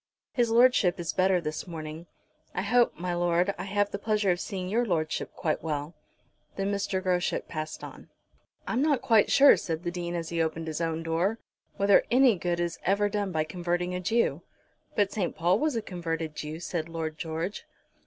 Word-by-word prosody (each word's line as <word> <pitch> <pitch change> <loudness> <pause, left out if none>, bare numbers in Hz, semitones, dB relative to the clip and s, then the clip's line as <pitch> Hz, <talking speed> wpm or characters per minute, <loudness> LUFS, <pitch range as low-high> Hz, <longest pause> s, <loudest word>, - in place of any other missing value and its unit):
"His 240 -3 +1
Lordship 230 -6 +4
is 170 -2 -2
better 185 -1 +3
this 155 0 -4
morning. 160 0 -7 0.5
I 185 - -1
hope, 240 0 +3
my 175 +1 -2
Lord, 175 +2 +1
I 180 - -4
have 205 +1 0
the 200 - -4
pleasure 210 -2 +1
of 175 - -1
seeing 185 -1 -4
your 225 +6 +1
Lordship 160 -8 -1
quite 155 -4 -1
well." 150 0 -3 0.6
Then 195 +1 -1
Mr. 195 -2 -1
Groschut 180 -2 0
passed 155 -1 -5
on. - - -10 0.6
"I'm 240 - 0
not 290 -4 +2
quite 225 -5 +4
sure," 280 +1 +7
said 165 0 -4
the 175 - -2
Dean, 175 -1 -4
as 165 -1 -3
he 170 -1 0
opened 160 0 -2
his 160 0 -4
own 165 0 -1
door, 170 +7 0 0.4
"whether 200 0 +5
any 250 -2 +5
good 175 -1 -2
is 170 -1 -2
ever 200 +2 +2
done 205 -2 -2
by 155 -2 +1
converting 175 +2 -2
a 180 - -2
Jew." 225 +6 +1 0.5
"But 205 -2 +2
St. 190 -5 -2
Paul 175 +4 +2
was 305 -4 0
a 225 - -1
converted 165 -4 -4
Jew," 155 +1 -5
said 170 -1 -3
Lord 160 -2 -4
George. 165 +4 -4
180 Hz, 195 wpm, -28 LUFS, 165-205 Hz, 0.6 s, sure